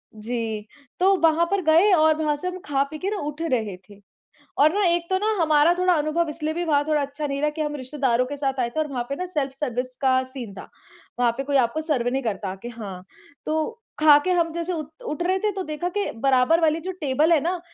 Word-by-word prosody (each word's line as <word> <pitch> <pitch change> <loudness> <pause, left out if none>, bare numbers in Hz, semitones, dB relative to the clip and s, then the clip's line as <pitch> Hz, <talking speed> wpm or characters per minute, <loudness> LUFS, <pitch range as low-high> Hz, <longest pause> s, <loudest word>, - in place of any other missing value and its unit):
जी, 220 -1 -4 0.3
तो 385 +2 +5
वहाँ 330 +1 +4
पर 400 -1 +1
गए 330 +6 +5
और 315 -2 +5
वहाँ 300 -1 +1
से 365 - -5
हम 365 0 -4
खा-पीके 290 +6 -1
ना 420 - -2
उठ 295 +1 -5
रहे 230 - -1
थे। 205 0 -15 0.6
और 305 +4 +5
ना 410 0 +1
एक 345 -1 +2
तो 375 - +2
ना 430 +2 +1
हमारा 310 +1 +4
थोड़ा 365 0 +4
अनुभव 310 +1 0
इसलिए 305 0 -3
भी 345 - -2
वहाँ 290 -2 +2
थोड़ा 300 -2 +2
अच्छा 285 +2 -4
नहीं 275 0 -3
रहा 300 - +2
कि 310 +1 -5
हम 295 -1 -2
रिश्तेदारों 260 -2 0
के 285 +3 -5
साथ 270 -2 -2
आए 235 - +1
थे 315 - 0
और 310 - 0
वहाँ 245 -3 -2
पे 280 - -2
ना 365 - -4
सेल्फ 295 -7 -2
सर्विस 255 -2 -3
का 260 -1 +3
सीन 255 -6 -8
था, 195 - -10 0.5
वहाँ 240 -1 +3
पे 270 - -2
कोई 280 0 +1
आपको 255 +5 +1
सर्व 290 -7 -1
नहीं 270 0 -1
करता 200 -3 -3
कि 240 - -6
हाँ, 200 -6 -8 0.4
तो 315 +10 -2 0.2
खाके 305 +3 +6
हम 335 -2 +2
जैसे 340 +2 -3
उठ 310 -3 -4 0.2
उठ 345 +3 -3
रहे 375 +2 +1
थे 425 +1 0
तो 385 -1 -4
देखा 310 +2 -3
कि 410 - -1
बराबर 265 +6 +3
वाली 320 0 +2
जो 370 +3 -5
टेबल 295 +4 +2
है 310 - +5
ना, 350 +3 -1
300 Hz, 240 wpm, -24 LUFS, 260-335 Hz, 0.6 s, खाके